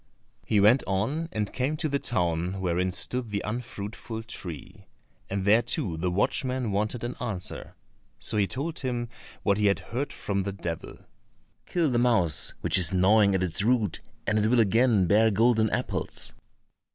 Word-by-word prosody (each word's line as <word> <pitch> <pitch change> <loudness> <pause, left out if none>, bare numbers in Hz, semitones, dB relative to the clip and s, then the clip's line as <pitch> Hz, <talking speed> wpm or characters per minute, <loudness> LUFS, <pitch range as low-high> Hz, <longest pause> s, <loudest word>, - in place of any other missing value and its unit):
He 105 - +3
went 110 +7 +5
on 135 - -1
and 105 -2 -3
came 135 +4 -1
to 160 0 -1
the 140 -1 0
town 90 -4 -1
wherein 90 0 0
stood 120 +6 -1
the 100 -1 -2
unfruitful 110 0 -5
tree, 90 -9 -9 0.4
and 95 -1 -2
there 110 +3 +5
too 90 -7 -2
the 85 +3 -1
watchman 125 +4 0
wanted 105 +4 -1
an 120 +1 -3
answer. 105 -8 -4 0.4
So - - -1
he 100 -2 +3
told 145 +9 -4
him 120 -3 -3 0.3
what 100 +1 +2
he 105 - +3
had 100 - +3
heard 130 +6 -4
from 100 -1 -2
the 100 +1 -3
devil: 85 -4 -6 0.7
"Kill 165 -5 +1
the 120 - +2
mouse 95 - +2
which - - +3
is 85 -4 +5
gnawing 100 +2 +4
at 95 - +1
its 90 -1 +2
root, 110 -3 +1 0.2
and 110 - +1
it 105 - +2
will 120 +2 +3
again 115 -1 +4
bear 110 +4 +4
golden 110 +1 +3
apples." - - -3
105 Hz, 170 wpm, -27 LUFS, 95-120 Hz, 0.7 s, went